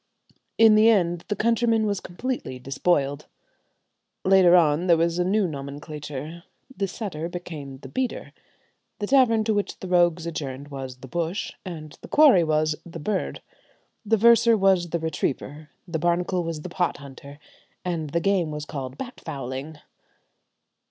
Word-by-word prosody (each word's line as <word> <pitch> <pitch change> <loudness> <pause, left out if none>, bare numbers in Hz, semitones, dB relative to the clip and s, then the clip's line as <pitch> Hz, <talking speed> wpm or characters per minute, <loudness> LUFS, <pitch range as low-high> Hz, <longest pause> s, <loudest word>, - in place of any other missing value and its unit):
In 225 -1 +7
the 215 +1 +6
end 175 -6 +2
the 210 - -1
countryman 230 0 +2
was 200 -2 -1
completely 235 - -5
despoiled. 140 +2 0 1.0
Later 185 -2 +6
on 165 0 +3
there 170 -2 +5
was 170 +1 +1
a - - +3
new 195 +2 +2
nomenclature: 150 +2 -7 0.3
the 195 - -1
setter 180 -5 -5
became 155 -6 -7
the - - -11
"beater," 260 -1 -3 0.6
the 205 - -3
tavern 230 -3 +4
to 220 0 +1
which 205 -1 -2
the 190 - -7
rogues 175 -2 +2
adjourned 145 -4 -5
was 130 -2 -7
the 130 - -9
"bush," 170 - -3
and 155 -5 -8
the - - -10
quarry 280 - +6
was 155 -1 +1
the 170 -1 -9
"bird." 190 +5 -3 0.6
The 220 +1 +2
verser 235 +1 +5
was 190 -3 +3
the 170 - -1
"retriever," 155 -1 -3 0.2
the 165 -2 -3
barnacle 175 +2 0
was 165 -2 -4
the 180 - -6
"pot 175 0 -1
hunter," 140 0 -12 0.5
and 165 -4 -2
the 170 - 0
game 185 -3 +1
was 150 0 -5
called 135 -3 -6
"bat 250 -1 -8
fowling." 135 +3 -6
170 Hz, 155 wpm, -25 LUFS, 150-200 Hz, 1.0 s, In